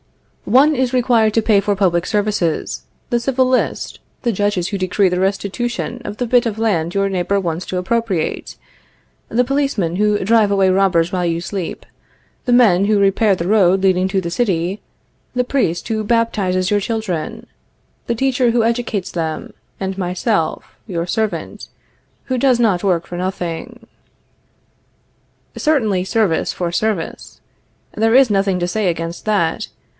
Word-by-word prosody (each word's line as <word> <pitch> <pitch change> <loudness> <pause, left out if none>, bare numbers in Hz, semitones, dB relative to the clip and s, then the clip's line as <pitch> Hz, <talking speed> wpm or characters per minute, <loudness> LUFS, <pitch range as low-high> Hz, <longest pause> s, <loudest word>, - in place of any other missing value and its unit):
One 275 +7 +4
is 260 -1 0
required 235 -4 +3
to 225 - +4
pay 210 -2 +4
for 205 +1 0
public 180 -3 +1
services, 205 -6 -1 0.3
the 240 - +2
civil 260 0 +1
list, 255 0 -1 0.2
the 240 - +1
judges 205 -3 0
who 200 - -2
decree 185 +2 +2
the 180 0 0
restitution 205 +6 -2
of 210 -2 -6
the 245 - -1
bit 245 +1 +3
of 220 -1 -4
land 175 -7 0
your 195 0 +2
neighbor 195 +1 0
wants 170 -2 -3
to 185 - -3
appropriate, 190 -2 -2 0.7
the 250 +2 +1
policemen 275 - 0
who 210 0 +2
drive 220 -1 +4
away 195 -1 +3
robbers 185 -3 +2
while 180 -1 0
you 165 -1 0
sleep, 180 0 -5 0.6
the 250 - 0
men 210 -7 +5
who 210 0 +2
repair 200 +1 +3
the 170 -1 -4
road 195 -2 +3
leading 185 -1 +3
to 195 0 +1
the 170 -2 -4
city, 185 -3 -1 0.5
the 250 - +2
priest 245 -11 -1
who 220 -1 -1
baptizes 205 -5 0
your 205 0 +2
children, 195 -8 -3 0.6
the 235 - 0
teacher 255 0 +1
who 235 -1 +2
educates 230 -4 -1
them, 160 -2 -4 0.3
and 190 0 -3
myself, 180 -1 -2
your 170 -4 -2
servant, 220 +3 -3 0.6
who 255 - -1
does 255 -2 +3
not 210 -6 +2
work 175 -4 +1
for 175 - -7
nothing. 185 +6 -5 1.7
Certainly, 220 -12 +1
service 195 -4 +1
for 175 -2 -3
service. 195 -1 -3 0.6
There 225 +2 +2
is 265 -2 +6
nothing 195 -2 +1
to 175 - -1
say 205 +2 -1
against 165 0 -4
that. 195 -7 0
200 Hz, 155 wpm, -18 LUFS, 180-230 Hz, 1.7 s, is